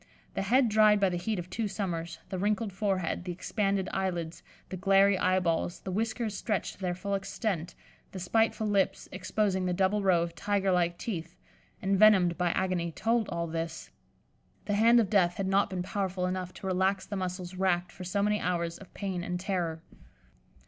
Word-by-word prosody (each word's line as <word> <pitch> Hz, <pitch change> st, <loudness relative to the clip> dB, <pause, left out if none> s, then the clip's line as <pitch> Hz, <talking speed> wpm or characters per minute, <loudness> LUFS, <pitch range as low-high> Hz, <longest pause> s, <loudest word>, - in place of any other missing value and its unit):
The -, -, -2 dB
head 245 Hz, +6 st, +3 dB
dried 215 Hz, -1 st, +5 dB
by 195 Hz, -1 st, +3 dB
the 175 Hz, -, -2 dB
heat 210 Hz, +5 st, -2 dB
of 175 Hz, 0 st, -5 dB
two 215 Hz, +4 st, -2 dB
summers, 175 Hz, -5 st, -3 dB
the 185 Hz, -, -3 dB
wrinkled 210 Hz, +1 st, 0 dB
forehead, 190 Hz, -4 st, -1 dB
the 180 Hz, -, -4 dB
expanded 195 Hz, +1 st, -1 dB
eyelids, 175 Hz, -4 st, -2 dB, 0.3 s
the -, -, -4 dB
glary 195 Hz, +2 st, +4 dB
eyeballs, 180 Hz, -2 st, 0 dB
the 190 Hz, -, -5 dB
whiskers 220 Hz, +1 st, -1 dB
stretched 210 Hz, 0 st, -2 dB
to -, -, -20 dB
their 180 Hz, -1 st, -1 dB
full 200 Hz, +3 st, -4 dB
extent, 195 Hz, -3 st, -2 dB, 0.4 s
the 190 Hz, -, -6 dB
spiteful 220 Hz, +4 st, +1 dB
lips, 195 Hz, -2 st, +1 dB
exposing 190 Hz, -4 st, 0 dB
the 180 Hz, -, 0 dB
double 195 Hz, +3 st, +2 dB
row 180 Hz, -4 st, +3 dB
of 170 Hz, -1 st, -5 dB
tiger 195 Hz, +1 st, 0 dB
like 175 Hz, -1 st, +1 dB
teeth, 175 Hz, -6 st, -5 dB, 0.5 s
envenomed 195 Hz, -3 st, +5 dB
by 180 Hz, 0 st, +1 dB
agony, 180 Hz, -3 st, -1 dB
told 225 Hz, +4 st, 0 dB
all 170 Hz, 0 st, -2 dB
this. 165 Hz, 0 st, -5 dB, 0.7 s
The 205 Hz, -, -1 dB
hand 230 Hz, +3 st, +6 dB
of 225 Hz, -, +2 dB
death 180 Hz, -4 st, +3 dB
had 195 Hz, -, -2 dB
not 195 Hz, +2 st, +2 dB
been 185 Hz, -2 st, -3 dB
powerful 190 Hz, -1 st, -2 dB
enough 185 Hz, 0 st, -3 dB
to -, -, -9 dB
relax 190 Hz, +1 st, +1 dB
the 205 Hz, -, -5 dB
muscles 185 Hz, -1 st, -4 dB
racked 180 Hz, -1 st, 0 dB
for 185 Hz, -, -9 dB
so 200 Hz, +3 st, -1 dB
many 210 Hz, 0 st, +2 dB
hours 170 Hz, -2 st, -2 dB
of 195 Hz, -, -14 dB
pain 190 Hz, -3 st, -3 dB
and 180 Hz, 0 st, -3 dB
terror. 175 Hz, -4 st, -2 dB
190 Hz, 185 wpm, -29 LUFS, 180-200 Hz, 0.7 s, hand